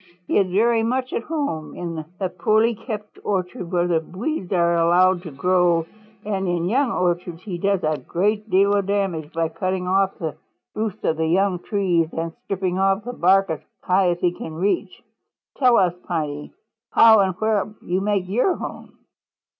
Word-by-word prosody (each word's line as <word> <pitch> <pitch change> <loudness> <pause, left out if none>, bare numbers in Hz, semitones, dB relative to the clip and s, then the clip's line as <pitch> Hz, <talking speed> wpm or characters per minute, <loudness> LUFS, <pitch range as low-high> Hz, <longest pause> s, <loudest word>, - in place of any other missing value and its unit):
He - - +2
is 190 -2 +1
very 225 +4 +3
much 255 +3 -1
at - - -1
home 280 - -3
in 165 -2 -5 0.2
a 190 - 0
poorly 220 +5 +2
kept 210 -1 -7
orchard 185 -1 -3
where 175 -1 +2
the 170 -2 +2
weeds 190 - -4
are 170 -2 +3
allowed 175 +2 +4
to 170 -3 -8
grow 175 +2 +2 0.4
and 195 -2 -2
in 175 -1 0
young 260 +6 +2
orchards 175 -2 -1
he 185 -5 -5
does 195 0 +1
a 155 -1 0
great 210 - -1
deal 200 +1 +4
of 200 -1 +1
damage 190 -7 -1
by 165 -1 -1
cutting 185 +2 -2
off 195 +1 +1
the 160 -4 -4 0.4
roots 215 -2 -4
of 160 - 0
young 180 +3 +2
trees 175 -5 0
and 165 0 -3
stripping 185 -1 -2
off 195 +1 +2
the 245 - -5
bark 195 -2 +3
as 155 - -3 0.2
high 185 0 +3
up 175 - 0
as - - -23
he 175 - +3
can 160 -2 -8
reach. 190 +5 -1 0.6
Tell 250 -3 +5
us, 180 -3 +3
Piney, 150 -4 -3 0.4
how 220 -1 +7
and 190 -2 +2
where 215 0 0
you 185 +2 -1
make 200 -2 0
your 245 - +1
home." - - -8
185 Hz, 180 wpm, -22 LUFS, 170-205 Hz, 0.6 s, how